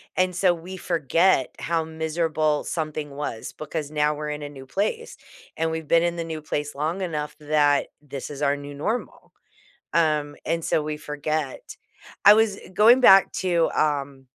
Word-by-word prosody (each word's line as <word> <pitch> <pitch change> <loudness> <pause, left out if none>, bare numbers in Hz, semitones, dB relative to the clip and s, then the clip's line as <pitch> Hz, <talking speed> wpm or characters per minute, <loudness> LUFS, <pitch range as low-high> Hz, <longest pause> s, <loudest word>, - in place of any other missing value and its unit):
and 185 0 +1
so 180 0 +3
we 175 +3 -8
forget 165 -3 +2
how 165 -1 0
miserable 160 -1 -1
something 155 -2 -4
was, 140 -5 -5
because 155 -1 -5
now 150 0 +1
we're 150 0 -5
in 150 0 -4
a 145 - -5
new 135 -2 -11
place, 210 - -3 0.4
and 165 - 0
we've 160 -1 -4
been 165 +2 +4
in 170 0 0
the 170 - -3
new 160 -1 -6
place 150 -1 -3
long 160 +6 -2
enough 150 -5 -3
that 145 -1 +2
this 140 -2 -7
is 145 -1 -8
our 140 -1 +2
new 145 0 -8
normal, 215 +12 -4 0.6
um, 150 -3 +1
and 165 -1 -1
so 155 - +1
we 150 0 -4
forget. 150 -1 -4 0.5
I 205 - +11
was, 215 -2 +2
eh, - - -13
going 225 +6 +6
back 195 -6 +7
to, 170 -3 +2
um, 140 -3 -1
155 Hz, 175 wpm, -24 LUFS, 145-170 Hz, 0.6 s, I